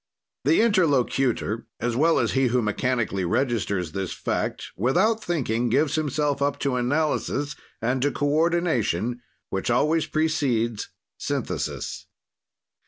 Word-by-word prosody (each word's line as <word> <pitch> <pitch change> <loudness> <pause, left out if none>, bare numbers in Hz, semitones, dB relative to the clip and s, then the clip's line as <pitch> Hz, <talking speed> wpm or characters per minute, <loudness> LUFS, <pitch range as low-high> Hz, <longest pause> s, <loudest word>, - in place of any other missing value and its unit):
The 160 +8 +4
interlocutor, 135 - +1
as 120 0 -1
well 160 +6 +3
as - - +1
he 135 -1 +2
who 125 0 +1
mechanically 110 -2 0
registers 100 - 0
this 95 +1 -3
fact, - - -3
without 190 - +2
thinking, 125 -8 0
gives 145 +5 +2
himself 150 -2 0
up 140 0 +1
to 140 -3 0
analysis 145 +2 0 0.3
and 125 +3 +1
to 145 +2 +2
coordination 145 - +1 0.3
which 95 +3 -2
always 150 +7 +2
precedes 130 -8 0 0.3
synthesis. - - -3
135 Hz, 115 wpm, -25 LUFS, 120-155 Hz, 0.3 s, The